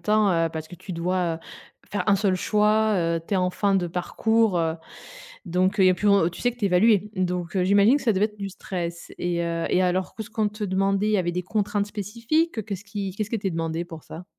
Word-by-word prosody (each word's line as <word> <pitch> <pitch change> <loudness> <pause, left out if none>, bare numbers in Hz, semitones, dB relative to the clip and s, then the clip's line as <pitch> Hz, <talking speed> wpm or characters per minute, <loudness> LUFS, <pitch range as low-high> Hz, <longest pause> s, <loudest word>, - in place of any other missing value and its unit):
temps, 210 -1 +3
heu, 165 -1 +2
parce 160 0 -6
que - - -10
tu 180 +2 -9
dois, 175 0 0
heu, - - -7 0.5
faire 200 -3 -2
1 200 - +5
seul 195 -1 +1
choix, 215 +2 +2
heu, 165 -2 0
tu - - -1
es - - +3
en 180 -1 +1
fin 200 +2 +1
de 185 -2 +1
parcours, 205 +4 +1
heu, 165 -1 0 0.7
donc 180 +2 +1
il 190 - +5
y 185 - +7
a - - +4
plus 185 +4 -1
vr 200 -4 +4
tu - - -9
sais 245 - +2
que 245 - -18
tu 220 - -1
es - - +4
évaluée. 205 +2 +3
Donc, 180 -1 -2
heu, 185 - +2
j'imagine 200 +7 +5
que - - -8
ça 225 - +3
devait 195 +2 +3
être 210 -1 -9
du 200 -1 -4
stress. 175 -3 -6
Et, 175 -1 -1
heu, 165 0 -2
et, 185 - +3
alors 185 0 0
que 220 - -5
ce - - -13
qu'on 215 -1 0
te 210 +1 -7
demandait? 195 +1 +1
Il - - +1
y 210 - +4
avait 175 -1 0
des 180 +1 -3
contraintes 205 +1 -1
spécifiques? 230 - -1
Heu, - - 0
qu'est-ce 200 -1 -6
qui 200 -1 -4
qu'est-ce 215 0 -3
qui 230 - -1
était 195 -3 -2
demandé 165 0 -2
pour 165 -3 -10
ça? 170 +3 -10
195 Hz, 265 wpm, -24 LUFS, 175-210 Hz, 0.7 s, y